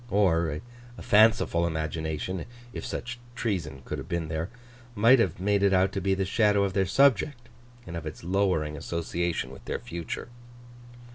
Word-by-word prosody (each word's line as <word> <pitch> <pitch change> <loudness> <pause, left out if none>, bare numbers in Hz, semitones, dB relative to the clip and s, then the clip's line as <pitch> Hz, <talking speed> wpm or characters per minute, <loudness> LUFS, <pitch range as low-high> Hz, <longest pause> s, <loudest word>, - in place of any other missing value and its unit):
Or, 85 -6 +2 0.4
a - - -9
fanciful 110 -6 +4
imagination—if 85 - -4
such 120 +1 -5 0.2
treason 85 - -3
could - - -4
have - - -8
been 85 -2 -2
there—might 120 +7 +1
have 90 -7 +1
made 100 +1 +2
it 100 -1 +4
out 95 +1 +3
to 95 - -3
be 95 +1 +2
the 95 0 0
shadow 105 0 +3
of 95 -1 -1
their 95 -1 +1
subject, 130 -1 +3 0.4
and 85 - -7
of 80 -2 -5
its 75 - -8
lowering 90 -5 +1
association 85 -3 -2
with 65 - -12
their - - -2
future. 85 +6 -6
95 Hz, 155 wpm, -27 LUFS, 85-115 Hz, 0.4 s, fanciful